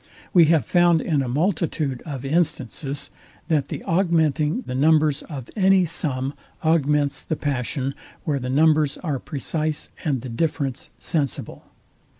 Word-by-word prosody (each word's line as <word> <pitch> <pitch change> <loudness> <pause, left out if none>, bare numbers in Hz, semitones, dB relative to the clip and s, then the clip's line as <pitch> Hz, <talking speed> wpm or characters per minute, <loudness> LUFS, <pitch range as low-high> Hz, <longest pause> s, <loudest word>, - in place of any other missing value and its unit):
We 175 -3 +7
have 155 -6 +3
found 175 -2 +4
in 150 -3 0
a 130 - -2
multitude 150 -2 0
of 140 -3 -5
instances, 140 -2 -2 0.4
that 150 -4 +2
the - - -6
augmenting 165 - +1
the 125 - -6
numbers 150 +1 +3
of 135 -6 -8
any 190 -2 +4
sum 140 -4 -2 0.3
augments 150 -3 +2
the 155 - -2
passion, 135 -1 -2 0.3
where 145 -3 0
the 125 0 -4
numbers 150 +1 +3
are 145 -6 -1
precise 155 +2 -2
and 140 -7 0
the 130 - -5
difference 140 0 -2
sensible. 145 -5 -3
150 Hz, 140 wpm, -23 LUFS, 135-160 Hz, 0.4 s, We